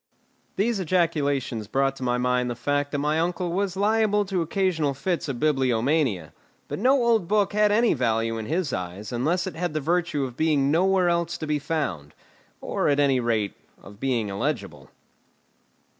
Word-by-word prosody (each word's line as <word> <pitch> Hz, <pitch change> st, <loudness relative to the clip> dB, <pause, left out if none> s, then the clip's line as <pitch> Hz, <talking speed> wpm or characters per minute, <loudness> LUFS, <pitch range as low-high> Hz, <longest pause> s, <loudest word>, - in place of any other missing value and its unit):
These 215 Hz, +2 st, 0 dB
ejaculations 145 Hz, -, 0 dB
brought 135 Hz, +3 st, 0 dB
to -, -, -12 dB
my 125 Hz, 0 st, +1 dB
mind 125 Hz, 0 st, +1 dB
the 120 Hz, -, -3 dB
fact 145 Hz, +4 st, -1 dB
that 145 Hz, -, -1 dB
my 150 Hz, +2 st, 0 dB
uncle 175 Hz, +1 st, -1 dB
was 190 Hz, +1 st, -1 dB
liable 210 Hz, 0 st, +2 dB
to 190 Hz, -2 st, -1 dB
occasional 165 Hz, -4 st, 0 dB
fits 170 Hz, +1 st, -2 dB
of 125 Hz, -3 st, -4 dB
bibliomania; 130 Hz, -, +1 dB, 0.3 s
but -, -, -5 dB
no 260 Hz, +3 st, +3 dB
old 225 Hz, -7 st, +2 dB
book 205 Hz, 0 st, +1 dB
had 210 Hz, 0 st, +3 dB
any 230 Hz, +2 st, +3 dB
value 115 Hz, -3 st, 0 dB
in 110 Hz, -, -6 dB
his 165 Hz, -4 st, -1 dB
eyes 90 Hz, +3 st, -5 dB
unless 155 Hz, +9 st, 0 dB
it 190 Hz, -, -5 dB
had 170 Hz, -1 st, -3 dB
the -, -, +1 dB
virtue 165 Hz, -1 st, 0 dB
of 125 Hz, -2 st, -5 dB
being 145 Hz, -2 st, +2 dB
nowhere 185 Hz, +2 st, +3 dB
else 170 Hz, -1 st, 0 dB
to 155 Hz, -, -5 dB
be 150 Hz, -1 st, 0 dB
found, 140 Hz, -, -3 dB, 0.5 s
or, -, -, -1 dB
at 145 Hz, 0 st, +2 dB
any 135 Hz, -3 st, +3 dB
rate, 115 Hz, -4 st, 0 dB, 0.3 s
of 100 Hz, +1 st, -14 dB
being 120 Hz, -5 st, -1 dB
illegible. 100 Hz, -, -4 dB
150 Hz, 175 wpm, -25 LUFS, 125-180 Hz, 0.5 s, no